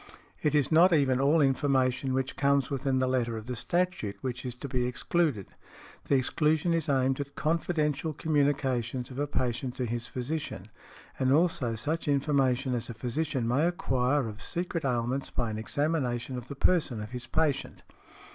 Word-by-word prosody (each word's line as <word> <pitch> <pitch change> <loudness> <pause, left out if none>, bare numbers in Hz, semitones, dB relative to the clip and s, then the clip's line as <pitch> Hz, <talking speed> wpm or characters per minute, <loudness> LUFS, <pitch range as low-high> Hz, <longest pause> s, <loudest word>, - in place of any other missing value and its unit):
It 150 -1 +1
is 145 0 +2
not 170 +4 +6
even 135 -5 +3
all 150 +4 +4
information 135 -1 +2
which 130 0 -1
comes 140 0 +2
within 135 -1 0
the 130 - +2
letter 120 -3 0
of 110 - -7
the 125 0 -4
statute 175 - -1
which 125 -2 -4
is 125 -2 -5
to 130 - -7
be 125 -2 0
excluded. 130 - 0 0.6
The 140 - +2
exclusion 155 +5 +2
is 165 -3 0
aimed 135 -1 +2
at 140 0 -5
confidential 155 -1 0
communications 135 -5 0
of 130 - -6
a 145 - 0
patient 125 -2 -2
to 125 - -2
his 120 0 -3
physician, 125 - -4 0.5
and 130 0 +2
also 140 -7 +2
such 155 +9 -2
information 135 -2 +2
as 120 0 -3
a 115 - -6
physician 130 +1 -2
may 140 +8 +2
acquire 135 -5 +1
of 110 0 -8
secret 175 -1 -3
ailments 125 +1 -1
by 120 -3 -2
an 110 - -4
examination 130 -1 -1
of 125 -1 -6
the 140 - -7
person 140 -6 +2
of 105 0 -7
his 125 -1 -6
patient. 145 -1 -1
135 Hz, 175 wpm, -29 LUFS, 125-150 Hz, 0.6 s, not